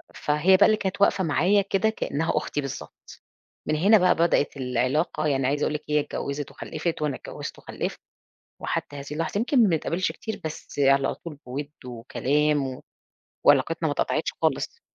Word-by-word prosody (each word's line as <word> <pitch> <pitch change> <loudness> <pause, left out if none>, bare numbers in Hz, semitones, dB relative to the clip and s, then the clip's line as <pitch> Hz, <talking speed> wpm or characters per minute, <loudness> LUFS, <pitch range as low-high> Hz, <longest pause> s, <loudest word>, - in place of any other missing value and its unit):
فهي 150 +6 +3
بقى 205 - +7
اللي 215 0 +4
كانت 195 0 -3
واقفة 200 -1 +4
معايا 180 +5 +3
كده 195 +2 +1
كأنها 165 -7 -1
أختي 145 - -1
بالضبط. 140 -2 -9 0.4
من 155 - 0
هنا 200 +8 +6
بقى 180 -2 +4
بدأت 165 -4 +2
العلاقة، 130 +5 0
يعني 135 -2 +1
عايزة 145 +2 0
أقول - - 0
لِك 150 - -3
هي 150 0 +3
اتجوزت 145 0 -4
وخلفت 170 -3 -4
وأنا 150 -3 0
اتجوزت - - -8
وخلفت، - - -5 0.6
وحتى 145 - -3
هذه 140 0 -7
اللحظة، 165 +6 -2
يمكن 245 +2 +3
ما 210 - +4
بنتقابلش 170 +2 0
كتير 220 0 -6
بس 155 -2 -6
على 135 0 +3
طول 165 -3 -9
بوِِدّ 140 +4 -5
وكلام 135 +4 0
و 130 0 -8 0.6
وعلاقتنا - - +3
ما - - 0
اتقطعتش - - -1
خالص. - - -1
150 Hz, 170 wpm, -25 LUFS, 140-185 Hz, 0.6 s, بقى